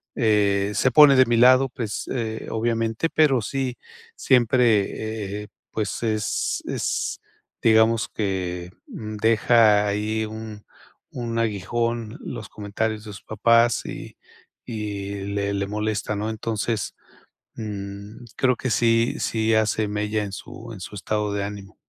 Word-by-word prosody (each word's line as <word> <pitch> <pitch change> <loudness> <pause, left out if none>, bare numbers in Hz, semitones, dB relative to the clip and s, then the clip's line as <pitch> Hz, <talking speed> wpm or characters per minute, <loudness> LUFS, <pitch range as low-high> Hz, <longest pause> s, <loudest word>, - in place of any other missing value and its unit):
eh, 105 -3 +2
se 130 +6 +2
pone 140 +1 +8
de 130 - +6
mi 120 -1 +2
lado, 130 +2 +6
pues, 115 -4 -4
eh, 110 -3 -3
obviamente, 115 +4 0
pero 140 -6 +3
sí 130 +3 -3 0.4
siempre, 110 -4 +1
eh, - - -11 0.2
pues, 110 +1 -3
es 110 -2 -1
es, - - -2 0.4
digamos 110 0 +4
que 90 -3 -3 0.2
deja 110 0 +3
ahí 105 +2 -1
un 110 -1 -8 0.5
un 115 -2 -3
aguijón 115 +2 -1
los - - -7
comentarios 105 +1 -3
de 105 - -8
sus 100 - -10
papás 115 +2 +3
y - - -8 0.5
y 100 -3 -4
le 100 0 -2
le 100 0 -1
molesta, 105 0 -2
¿no? 105 +2 -2
Entonces, 110 0 -2 0.6
mm, 100 +1 -7
creo 130 -1 +3
que 130 - -3
sí 115 0 +2
sí 110 0 +1
hace 110 0 +1
mella 105 +1 -1
en 100 - -5
su 115 +4 -9
en 95 - -9
su 95 +3 -8
estado 105 +1 -2
de 100 -1 -1
ánimo. 100 0 -7
110 Hz, 135 wpm, -24 LUFS, 105-115 Hz, 0.6 s, pone